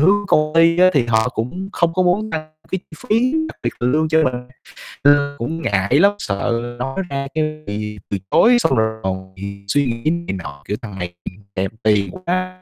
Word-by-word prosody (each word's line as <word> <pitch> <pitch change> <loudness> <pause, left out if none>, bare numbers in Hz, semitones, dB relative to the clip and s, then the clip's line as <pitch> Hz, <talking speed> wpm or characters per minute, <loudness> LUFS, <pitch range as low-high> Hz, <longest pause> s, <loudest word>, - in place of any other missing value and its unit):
hướng 205 +6 +4
công 155 0 +3
ty 165 +1 +5
á 185 0 +7
thì 130 -5 +3
họ 110 +1 +2
cũng 125 +12 -4
không 170 -4 +1
có 185 - +3
muốn 195 +5 +1
tăng 155 -4 -4 0.2
cái 190 - 0
chi 160 - -11
phí, 240 +4 +3 0.2
đặc - - -11
biệt 120 - 0
là 120 - +1
lương 155 +4 +2
cho 160 0 +4
mình 130 - +1 0.7
nên 145 0 +4
cũng 160 +7 -3
ngại 100 +3 +2
lắm, 200 +4 +6
sợ 115 +4 -2
nói 135 +6 -3
ra 140 0 -3
cái 155 -1 -2
bị 105 0 -4
từ 100 - -1
chối, 240 +1 +6
xong - - +2
rồi 110 0 0
còn 95 0 -4
bị 100 +1 -8
suy 140 +7 +2
nghĩ 115 +4 -1
này 170 - -3
nọ, 70 -2 -9
kiểu: 105 - -2
"Thằng 105 -6 -8
này 90 -1 -4 0.4
thèm 95 +1 -1
tiền 105 -2 +2
quá 185 0 -3
140 Hz, 215 wpm, -20 LUFS, 105-170 Hz, 0.7 s, á